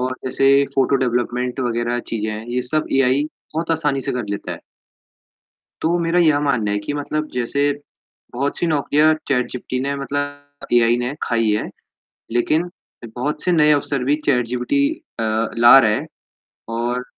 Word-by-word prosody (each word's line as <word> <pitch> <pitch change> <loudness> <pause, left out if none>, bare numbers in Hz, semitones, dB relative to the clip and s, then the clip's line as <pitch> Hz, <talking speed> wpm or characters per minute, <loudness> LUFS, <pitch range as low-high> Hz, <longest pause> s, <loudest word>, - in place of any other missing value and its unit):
और 130 +1 -1
जैसे 135 +2 +3
photo 135 0 +3
development 125 0 -1
वग़ैरह 120 0 -1
चीज़ें 110 -1 -2
हैं, 110 +1 -6
यह 120 +1 -1
सब 155 0 0
एआई 135 +1 +3 0.3
बहुत 165 +1 -2
आसानी 150 -4 0
से - - -3
कर 125 -2 -2
लेता 100 - -4
है। - - -8 1.2
तो 170 +2 +2
मेरा 170 +1 +1
यह 155 -4 +4
मानना 125 -8 0
है 105 - 0
कि 105 +7 -4
मतलब 150 +1 -3
जैसे 140 +4 0 0.6
बहुत 140 +3 -2
सी 175 - 0
नौकरियाँ 155 0 +3
चैटजीपीटी 125 -1 -1
ने 140 +1 -1
मतलब 145 +1 -5
एआई 120 0 +4
ने 125 +3 -2
खाई 115 -2 +1
है, 105 0 +1 0.7
लेकिन 155 +9 +1 0.5
बहुत 150 +4 -3
से 180 - +1
नए 150 -3 +5
अवसर 140 -2 0
भी 140 +3 +2
चैटजीपीटी 125 - +1 0.4
अ, - - 0 0.3
ला 120 +3 +9
रहा 110 -4 +3
है 105 - -1 0.7
और 120 +2 -1
135 Hz, 160 wpm, -20 LUFS, 120-145 Hz, 1.2 s, ला